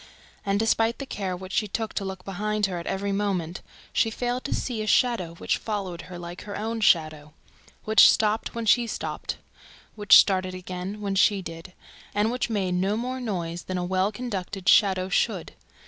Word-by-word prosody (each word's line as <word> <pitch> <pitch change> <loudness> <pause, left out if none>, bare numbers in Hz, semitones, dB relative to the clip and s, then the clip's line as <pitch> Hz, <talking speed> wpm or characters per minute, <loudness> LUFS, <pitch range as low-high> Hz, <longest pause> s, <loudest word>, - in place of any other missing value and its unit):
And, 200 0 0
despite 225 +1 +2
the 275 - -5
care 190 -7 -4
which 185 +1 -9
she 210 - 0
took 220 +1 -3
to 200 - -2
look 190 -1 -6
behind 210 +2 -1
her 180 -3 -3
at 170 - -8
every 200 +1 -2
moment, 190 -4 -2 0.3
she 225 - +2
failed 245 +2 -2
to - - -1
see 235 -4 -3
a 215 - -4
shadow 200 -9 +2
which - - -1
followed 195 -5 -4
her 180 - -7
like 175 +1 -8
her 205 -1 -6
own 225 +2 -3
shadow, 155 -5 +2 0.5
which 220 0 +7
stopped 215 +1 +1
when 230 -1 -3
she 235 +2 +4
stopped, - - -4 0.6
which 205 -1 +7
started 185 -2 +3
again 185 +3 -6
when 200 -1 -2
she 195 0 +3
did 165 +2 -9 0.4
and 210 +2 +2
which 250 0 -2
made 195 -5 -1
no 190 +4 +1
more 255 +2 -3
noise 175 -7 -4
than 185 - -3
a 180 - -2
well 190 +2 +1
conducted 200 -4 -5
shadow 190 -3 +5
should. 190 - 0
200 Hz, 190 wpm, -26 LUFS, 185-220 Hz, 0.6 s, which